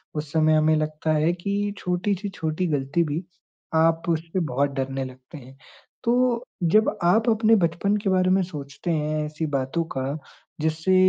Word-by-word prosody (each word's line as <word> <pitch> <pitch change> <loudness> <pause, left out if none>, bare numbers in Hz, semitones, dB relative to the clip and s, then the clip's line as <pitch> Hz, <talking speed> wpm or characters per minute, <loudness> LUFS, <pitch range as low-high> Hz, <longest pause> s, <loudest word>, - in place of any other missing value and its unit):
उस 150 -1 -4
समय 155 0 +4
हमें 155 0 +4
लगता 155 +1 -1
है 155 +2 +3
कि 200 +3 -2
छोटी 180 +3 0
से 205 - -3
छोटी 165 0 -2
ग़लती 145 +2 0
भी 155 +3 -3 0.5
आप 165 +1 +3
उस 160 -1 +1
पे 185 - +1
बहुत 140 -3 0
डरने 135 0 -2
लगते 130 +4 -11
हैं। 130 0 -13 0.5
तो 245 0 +2 0.2
जब 215 +6 +3
आप 220 +7 +4
अपने 220 0 +4
बचपन 185 +2 +1
के 200 -1 -1
बारे 185 -1 +3
में 190 - +4
सोचते 150 -1 -5
हैं 155 -1 0
ऐसी 155 +1 -4
बातों 135 +5 0
का 135 +3 -2 0.4
जिससे 160 +4 +1
160 Hz, 175 wpm, -24 LUFS, 150-185 Hz, 0.5 s, समय